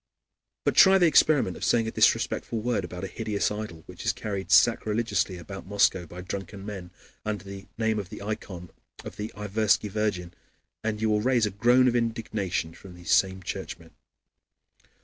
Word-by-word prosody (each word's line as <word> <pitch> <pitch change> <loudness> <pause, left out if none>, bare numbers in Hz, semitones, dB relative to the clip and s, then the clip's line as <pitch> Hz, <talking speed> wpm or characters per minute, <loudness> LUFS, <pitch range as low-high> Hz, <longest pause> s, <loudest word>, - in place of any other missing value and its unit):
But - - +2
try 190 0 +8
the 180 - +4
experiment 150 - +4
of - - -8
saying 115 -2 +2
a - - -2
disrespectful 115 - +1
word 115 -3 -1
about 90 +1 -7
a - - -2
hideous 105 0 -2
idol 105 -6 -6
which - - -10
is - - +1
carried 100 -3 -5
sacrilegiously 110 -4 +2
about 95 +3 -9
Moscow 95 -3 +2
by 90 +3 -9
drunken 95 +1 -6
men 95 -4 -7 0.3
under 105 -1 -3
the 100 -1 -9
name 110 -1 0
of 95 -3 -6
the 105 - -8
ikon 100 -5 -6 0.3
of - - -8
the 105 +1 -5
Iversky 105 0 +1
virgin, 95 -5 -2 0.5
and 110 -1 -2
you 110 0 +1
will 105 0 +2
raise 125 -1 +2
a 105 - -2
groan 120 +6 +4
of 120 - +2
indignation 110 -8 -2
from 90 +1 -13
these 90 0 -6
same 95 -1 +2
Churchmen. 80 -1 -6
105 Hz, 175 wpm, -27 LUFS, 95-110 Hz, 0.5 s, try